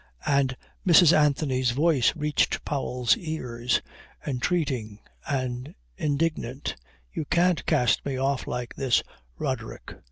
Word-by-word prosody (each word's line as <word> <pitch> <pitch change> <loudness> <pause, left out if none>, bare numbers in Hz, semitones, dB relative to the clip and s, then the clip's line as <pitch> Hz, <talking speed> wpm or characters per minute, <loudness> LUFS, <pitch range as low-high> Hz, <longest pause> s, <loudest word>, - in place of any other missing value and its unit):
And 135 -2 +2 0.3
Mrs. 175 -2 +7
Anthony's 140 -4 +2
voice 145 +1 +2
reached 150 -2 0
Powell's 125 -4 +1
ears, 125 -7 -2 0.4
entreating 130 -6 -1 0.3
and 130 -1 -3 0.2
indignant. 145 -3 -1 0.4
"You 155 - -3
can't 175 +1 +2
cast 125 -2 +2
me 135 -2 -3
off 135 0 -1
like 125 -1 -4
this, 130 -3 +2 0.3
Roderick. - - -4
140 Hz, 105 wpm, -26 LUFS, 125-155 Hz, 0.4 s, Mrs